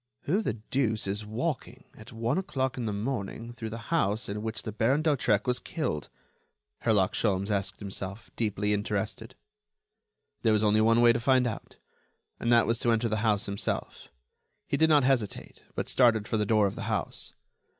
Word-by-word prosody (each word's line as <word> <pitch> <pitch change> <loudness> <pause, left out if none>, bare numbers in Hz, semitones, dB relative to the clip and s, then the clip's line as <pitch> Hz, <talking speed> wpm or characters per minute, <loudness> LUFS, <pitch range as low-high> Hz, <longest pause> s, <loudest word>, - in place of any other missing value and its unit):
"Who 190 +9 +1
the 210 - -1
deuce 110 0 -1
is 100 +2 -3
walking, 125 +6 -3
at - - -13
one 115 +9 0
o'clock 130 -8 -2
in 120 -3 -3
the - - -1
morning, 115 +1 -4
through 115 -2 -6
the 115 +6 -8
house 110 -7 +1
in 105 +1 -4
which 110 0 -4
the 110 - -4
Baron 125 +8 +1
d'Hautrec 125 -9 +2
was 125 0 +1
killed?" 115 - -3 0.7
Herlock 105 -5 +2
Sholmes 100 -1 0
asked 100 -1 -1
himself, 100 +1 -5
deeply 105 -2 0
interested. 105 +3 -3 1.1
There 110 -2 +3
was 105 0 +2
only 105 0 +4
one 115 +2 +4
way 120 -1 +7
to 115 - -1
find 130 +1 +3
out, 115 -3 -5 0.6
and 120 - 0
that 120 -1 +6
was 115 0 0
to 120 - +2
enter 115 +1 +1
the 110 - 0
house 110 -1 +1
himself. 100 -1 -3 0.6
He - - -1
did 160 0 +4
not 150 -3 +5
hesitate, 125 -6 -1
but - - -2
started 115 -4 +3
for 110 - 0
the 105 -1 0
door 110 -2 +4
of 100 - -1
the - - -6
house. - - -3
110 Hz, 185 wpm, -28 LUFS, 105-125 Hz, 1.1 s, way